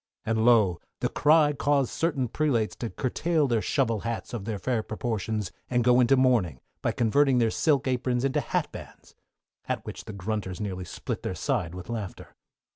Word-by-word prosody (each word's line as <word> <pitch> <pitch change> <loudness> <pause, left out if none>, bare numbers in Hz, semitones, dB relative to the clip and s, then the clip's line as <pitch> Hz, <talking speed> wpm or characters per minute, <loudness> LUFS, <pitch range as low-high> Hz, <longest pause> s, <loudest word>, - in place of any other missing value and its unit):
And 110 0 +1
lo, 110 -8 +4 0.2
the - - 0
cry 150 0 +4
caused 140 -2 +1
certain 145 -6 0
prelates 120 -4 0
to 115 - -4
curtail 150 +5 0
their 115 -3 +1
shovel 115 -5 +1
hats 115 +3 -4
of 110 -5 -4
their 110 -2 -2
fair 115 +3 -1
proportions 110 -2 -3 0.2
and 120 -1 +2
go 125 +1 +5
into 130 +2 +5
mourning, 115 - +2 0.2
by - - +1
converting 130 +3 +3
their 115 -2 +3
silk 140 -1 +2
aprons 125 0 0
into 135 - +1
hatbands, - - -5 0.5
at - - -2
which - - -7
the 110 - -7
grunters 100 -1 -4
nearly 95 -3 -4
split - - -5
their - - -3
side 85 +1 -1
with 90 -1 -8
laughter. 110 -5 -6
120 Hz, 175 wpm, -27 LUFS, 105-135 Hz, 0.5 s, go